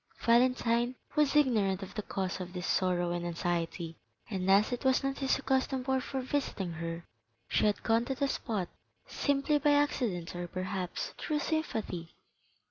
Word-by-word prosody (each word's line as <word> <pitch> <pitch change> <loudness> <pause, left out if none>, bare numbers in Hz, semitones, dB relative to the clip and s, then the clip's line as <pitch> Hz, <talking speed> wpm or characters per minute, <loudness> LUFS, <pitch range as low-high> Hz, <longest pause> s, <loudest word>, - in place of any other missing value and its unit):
Valentine 240 0 +3 0.2
was 300 -2 +3
ignorant 210 -9 +3
of 190 +1 -8
the 210 - -3
cause 190 -2 -3
of 180 0 -7
this 180 -1 -4
sorrow 175 -2 +1
and 175 0 -2
anxiety, 170 -1 -2 0.3
and 190 -2 -1
as 200 +4 +5
it 245 - -3
was 260 0 +3
not 275 0 -1
his 270 -1 +2
accustomed 265 -1 0
hour 265 -1 +2
for 265 +1 -3
visiting 255 -9 -2
her, 165 +1 -5 0.4
she - - +3
had 205 - 0
gone 225 +1 +3
to 265 +2 -2
the 280 +1 +1
spot 215 -9 -2 0.4
simply 285 +1 +1
by 295 0 +4
accident 235 - 0
or 175 0 -4
perhaps 185 0 -3
through 305 - -1
sympathy. 220 - -2
220 Hz, 165 wpm, -31 LUFS, 180-265 Hz, 0.4 s, as